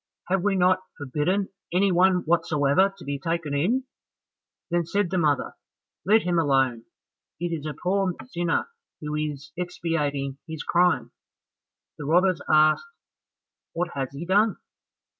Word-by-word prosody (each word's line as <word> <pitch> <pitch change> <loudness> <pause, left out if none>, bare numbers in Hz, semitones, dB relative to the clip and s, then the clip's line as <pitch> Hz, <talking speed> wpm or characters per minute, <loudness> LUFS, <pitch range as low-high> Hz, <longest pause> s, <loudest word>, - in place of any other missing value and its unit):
Have 190 0 +2
we 205 -1 +2
not 185 0 +3 0.2
forbidden 155 +8 -1 0.2
any 190 +3 +3
one 180 +1 +4
whatsoever 160 +2 +2
to - - -12
be 140 0 -3
taken 165 0 -2
in?" 205 - +1 0.9
Then 175 0 +2
said 190 +2 -1
the 185 - +1
mother, 145 -4 +1 0.5
"Let 215 +4 +4
him 175 -1 +1
alone, 135 -6 +1 0.5
it 175 0 -2
is 155 -2 -4
a 150 - -5
poor 190 +1 0
sinner 170 - -1 0.3
who 150 -1 -5
is 150 -1 -4
expiating 150 -6 -2
his 160 -2 -6
crime." 175 -2 +2 0.9
The 145 - -5
robbers 175 +1 +3
asked, 155 - +4 0.9
"What 175 +1 -1
has 135 -2 -3
he 140 +5 -7
done?" 205 +3 +3
170 Hz, 140 wpm, -25 LUFS, 145-185 Hz, 0.9 s, one